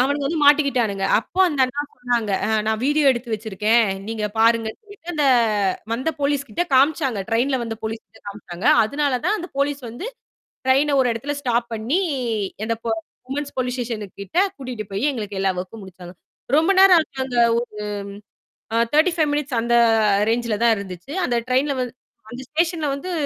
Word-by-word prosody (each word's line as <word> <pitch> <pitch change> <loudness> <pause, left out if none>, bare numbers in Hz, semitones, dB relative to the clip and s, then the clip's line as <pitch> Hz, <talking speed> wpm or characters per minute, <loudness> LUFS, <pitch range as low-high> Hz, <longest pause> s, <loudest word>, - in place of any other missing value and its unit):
அவனுங்க 285 +2 +1
வந்து 325 +4 -2
மாட்டிக்கிட்டானுங்க 265 -9 +3
அப்போ 235 - -4
அந்த 295 -6 -1
அண்ணா 255 +3 -3
சொன்னாங்க 240 -4 -1 0.3
நான் 220 0 +1
வீடியோ 295 +2 +2
எடுத்து 240 -1 -5
வச்சிருக்கேன். 220 +1 +1 0.3
நீங்க 220 -1 -3
பாருங்கன்னு 225 0 +2
சொல்லிட்டு 405 -5 -16
அந்த 300 -2 +1 0.7
வந்த 255 +7 -1
போலீஸ்கிட்ட 280 -2 0
காமிச்சாங்க. 270 -4 +2
ட்ரெயின்ல 250 +4 +2
வந்த 225 -1 -4
போலீஸ்கிட்ட 225 +1 -7
காமிச்சாங்க. 200 -1 -6 0.2
அதனால 280 +2 0
தான் 390 +5 +2
அந்த 355 - -6
போலீஸ் 280 0 0
வந்து 240 - -7 0.6
ட்ரெயின்ன 275 +2 +3
ஒரு 250 - +2
இடத்துல 280 +6 -4
ஸ்டாப் 240 -3 0
பண்ணி 230 - 0 0.7
அந்த 230 0 -1 0.5
விமென்ஸ் 285 +1 -4
போலீஸ் 250 -1 -1
ஸ்டேஷனு 230 -4 -4
கிட்ட 200 - -7 0.2
கூட்டிகிட்டு 250 -5 -6
போய் 225 +10 +1
எங்களுக்கு 210 -6 -5
எல்லா 195 -1 +2
ஒர்க்கும் 190 +4 -8
முடிச்சாங்க. 180 -2 -11 0.4
ரொம்ப 325 +5 +3
நேரம் 380 -2 +8
ஆச்சு. 290 - -11
அங்க 250 -2 -4 1.2
ஒரு - - -86 0.4
35 315 -1 +3
மினிட்ஸ் 285 -4 -1
அந்த 235 +1 +1 0.5
ரேஞ்சில்ல 230 -2 0
தான் 230 -1 +5
இருந்துச்சு. 190 +5 -8
அந்த 245 - -1
ட்ரெயின்ல 270 +3 +1
வந்து 245 -1 -5 0.4
அந்த 250 +1 -7
ஸ்டேஷன்ல 325 0 0
வந்து 320 +7 -6
250 Hz, 155 wpm, -22 LUFS, 225-290 Hz, 1.2 s, நேரம்